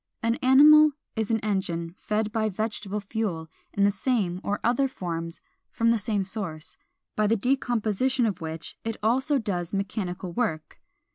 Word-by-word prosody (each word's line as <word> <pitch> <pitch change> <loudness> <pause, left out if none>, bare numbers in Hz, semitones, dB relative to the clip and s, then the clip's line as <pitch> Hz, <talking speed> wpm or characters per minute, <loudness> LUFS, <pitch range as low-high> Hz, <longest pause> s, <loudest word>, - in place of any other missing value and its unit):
An 230 0 +2
animal 300 +3 +7 0.2
is 220 -2 -1
an 225 -1 +2
engine 175 -5 -2
fed 215 0 -1
by 220 0 0
vegetable 210 0 -3
fuel 195 -6 -3 0.2
in 200 - +1
the 200 - +5
same 195 -4 -1
or 205 - -1
other 250 +4 +2
forms, 170 -8 -5 0.3
from 230 0 +2
the 230 - +3
same 205 -1 -1
source, 185 -6 -6 0.4
by 215 0 +2
the 225 +2 +2
decomposition 245 0 +1
of 195 -6 -2
which 160 0 -6
it 225 -1 -3
also 265 +6 +2
does 185 -6 -3
mechanical 195 -2 -3
work. 170 -10 -3
210 Hz, 155 wpm, -26 LUFS, 185-230 Hz, 0.4 s, animal